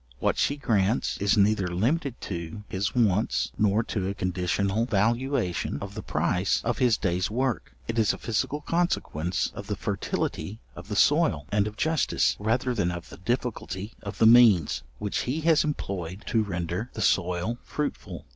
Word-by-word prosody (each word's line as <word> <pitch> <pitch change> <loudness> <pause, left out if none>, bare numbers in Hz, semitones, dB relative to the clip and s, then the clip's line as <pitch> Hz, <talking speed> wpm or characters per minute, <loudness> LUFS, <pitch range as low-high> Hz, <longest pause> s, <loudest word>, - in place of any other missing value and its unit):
What - - 0
she 145 - +1
grants 110 -5 +1
is 100 +2 +2
neither 100 -2 +3
limited 120 - -1
to 85 +3 -5
his 95 +5 -2
wants, 110 -2 +2
nor 105 +1 +3
to 95 -4 -2
a 100 - -3
conditional 95 +4 0
valuation 115 - 0
of 100 0 -7
the 110 - -5
price 90 +3 0
of 120 -1 -1
his 120 -4 +4
day's 90 -1 0
work. 125 +3 -2
It 115 0 -1
is 110 -2 +4
a - - -5
physical 130 +6 -2
consequence 145 - -1
of - - -8
the - - -2
fertility 105 +3 -3 0.2
of 90 +2 -10
the 105 - -4
soil, 140 - +3
and 105 0 +2
of 105 0 -7
justice, 155 - +1
rather 120 +4 0
than 100 -7 0
of 90 -1 -6
the - - -11
difficulty 105 -2 -3
of 100 -1 -7
the - - +4
means, 110 -8 +6 0.2
which 105 -1 -2
he 150 +5 -1
has 160 -1 +4
employed 95 - -4
to 115 - +2
render 90 +2 -3
the - - -5
soil 90 +6 +1
fruitful. 150 -1 -5
105 Hz, 170 wpm, -27 LUFS, 95-120 Hz, 0.2 s, means